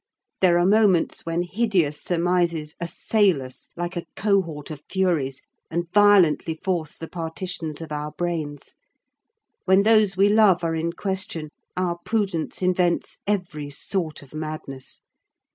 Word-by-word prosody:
There 175 Hz, -2 st, +5 dB
are 175 Hz, -, +3 dB
moments 195 Hz, -5 st, +3 dB
when 165 Hz, +1 st, 0 dB
hideous 180 Hz, -6 st, 0 dB
surmises 170 Hz, -3 st, 0 dB
assail 185 Hz, 0 st, +2 dB
us 130 Hz, 0 st, -12 dB
like 175 Hz, +1 st, -3 dB
a 175 Hz, -, -4 dB
cohort 180 Hz, -8 st, 0 dB
of 150 Hz, -2 st, -7 dB
furies, 165 Hz, -9 st, 0 dB, 0.3 s
and 170 Hz, +1 st, -3 dB
violently 190 Hz, -6 st, +5 dB
force 170 Hz, -5 st, -1 dB
the 165 Hz, -, -8 dB
partitions 165 Hz, -1 st, -5 dB
of 160 Hz, -2 st, -8 dB
our 150 Hz, 0 st, -3 dB
brains. 155 Hz, -3 st, -4 dB, 0.9 s
When 190 Hz, +1 st, +5 dB
those 215 Hz, -3 st, +4 dB
we 195 Hz, +1 st, +5 dB
love 205 Hz, -4 st, +5 dB
are 165 Hz, -1 st, 0 dB
in 165 Hz, +1 st, -1 dB
question, 190 Hz, -6 st, -4 dB, 0.3 s
our 175 Hz, -2 st, -1 dB
prudence 195 Hz, -6 st, -1 dB
invents 180 Hz, -1 st, +1 dB
every 175 Hz, -8 st, -2 dB
sort 155 Hz, +2 st, -3 dB
of 140 Hz, -, -18 dB
madness. 155 Hz, -4 st, -6 dB
175 Hz, 135 wpm, -24 LUFS, 155-190 Hz, 0.9 s, There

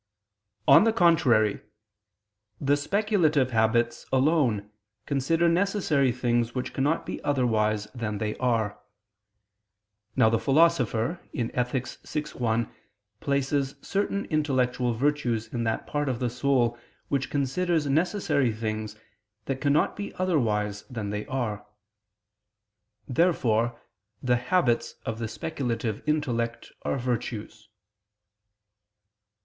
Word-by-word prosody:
On -, -, +8 dB
the 225 Hz, -, +4 dB
contrary, 130 Hz, -, +3 dB, 1.0 s
The 140 Hz, +1 st, +2 dB
speculative 155 Hz, -, +1 dB
habits 115 Hz, +1 st, +1 dB
alone 130 Hz, -7 st, +2 dB, 0.3 s
consider 160 Hz, +5 st, +1 dB
necessary 170 Hz, -7 st, +2 dB
things 120 Hz, -1 st, 0 dB
which 125 Hz, -, -3 dB
cannot 145 Hz, +5 st, 0 dB
be -, -, -6 dB
otherwise 110 Hz, -6 st, +1 dB
than 110 Hz, -3 st, -3 dB
they 105 Hz, 0 st, -2 dB
are. 115 Hz, -5 st, 0 dB, 1.4 s
Now 125 Hz, -4 st, +5 dB
the 115 Hz, 0 st, +2 dB
Philosopher 140 Hz, +1 st, +2 dB, 0.2 s
(Ethic. 125 Hz, +1 st, -1 dB
vi, 150 Hz, -, -5 dB
1) 115 Hz, -1 st, -1 dB, 0.5 s
places 140 Hz, 0 st, 0 dB
certain 200 Hz, 0 st, -1 dB
intellectual 130 Hz, -5 st, 0 dB
virtues 120 Hz, -4 st, 0 dB
in 120 Hz, -2 st, -1 dB
that 110 Hz, -, -1 dB
part 145 Hz, -1 st, -1 dB
of 125 Hz, -, -1 dB
the 120 Hz, -1 st, -1 dB
soul 120 Hz, -2 st, +1 dB, 0.3 s
which 140 Hz, -1 st, 0 dB
considers 150 Hz, +4 st, 0 dB
necessary 150 Hz, -, +1 dB
things 110 Hz, -1 st, -4 dB, 0.5 s
that 135 Hz, -1 st, -3 dB
cannot 145 Hz, +1 st, +2 dB
be 205 Hz, 0 st, -6 dB
otherwise 105 Hz, -, 0 dB
than 110 Hz, -5 st, -4 dB
they 105 Hz, +3 st, -4 dB
are. 120 Hz, -7 st, -2 dB, 1.4 s
Therefore 120 Hz, -7 st, +1 dB, 0.4 s
the 125 Hz, -1 st, +3 dB
habits 125 Hz, -2 st, +1 dB
of 110 Hz, 0 st, -3 dB
the 115 Hz, -, -2 dB
speculative 115 Hz, -2 st, -3 dB
intellect 120 Hz, -7 st, -1 dB
are -, -, -1 dB
virtues. 120 Hz, -4 st, -4 dB
125 Hz, 110 wpm, -27 LUFS, 115-145 Hz, 1.4 s, On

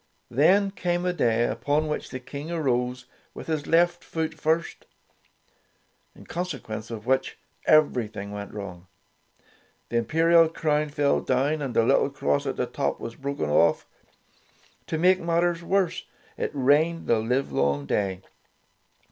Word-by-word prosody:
Then 190 Hz, -, +4 dB
came 175 Hz, -2 st, -2 dB
a 180 Hz, -, +1 dB
day 120 Hz, -8 st, +2 dB
upon 150 Hz, +5 st, 0 dB
which 150 Hz, -, -3 dB
the 130 Hz, -, -6 dB
King 140 Hz, +4 st, -8 dB
arose 125 Hz, -5 st, -1 dB, 0.3 s
with -, -, -8 dB
his 155 Hz, -2 st, -2 dB
left 175 Hz, +1 st, +3 dB
foot 160 Hz, -1 st, -3 dB
first, 160 Hz, +2 st, -1 dB, 1.3 s
in -, -, -15 dB
consequence 115 Hz, -11 st, -5 dB
of 110 Hz, -2 st, -7 dB
which 130 Hz, +1 st, 0 dB, 0.3 s
everything 110 Hz, -9 st, +2 dB
went 100 Hz, 0 st, -6 dB
wrong. 95 Hz, -4 st, -8 dB, 1.0 s
The 120 Hz, -, 0 dB
im 115 Hz, -, +1 dB
perial 165 Hz, +2 st, +4 dB
crown 150 Hz, -2 st, 0 dB
fell 145 Hz, -1 st, +1 dB
down, 140 Hz, +4 st, 0 dB
and 135 Hz, -4 st, -4 dB
the 115 Hz, -, +4 dB
little -, -, +3 dB
cross 70 Hz, 0 st, -1 dB
at -, -, -2 dB
the -, -, -1 dB
top -, -, -2 dB
was 115 Hz, -, -6 dB
broken 135 Hz, -, -3 dB
off. 85 Hz, -, +3 dB, 1.0 s
To 160 Hz, -, -2 dB
make 185 Hz, +3 st, +4 dB
mat 170 Hz, -1 st, +1 dB
ters 175 Hz, -1 st, 0 dB
worse, 185 Hz, 0 st, 0 dB, 0.3 s
it -, -, -2 dB
rained 150 Hz, +5 st, +2 dB
the 115 Hz, -, +2 dB
livelong 110 Hz, -, 0 dB
day. 95 Hz, +4 st, -1 dB
145 Hz, 150 wpm, -25 LUFS, 115-165 Hz, 1.3 s, Then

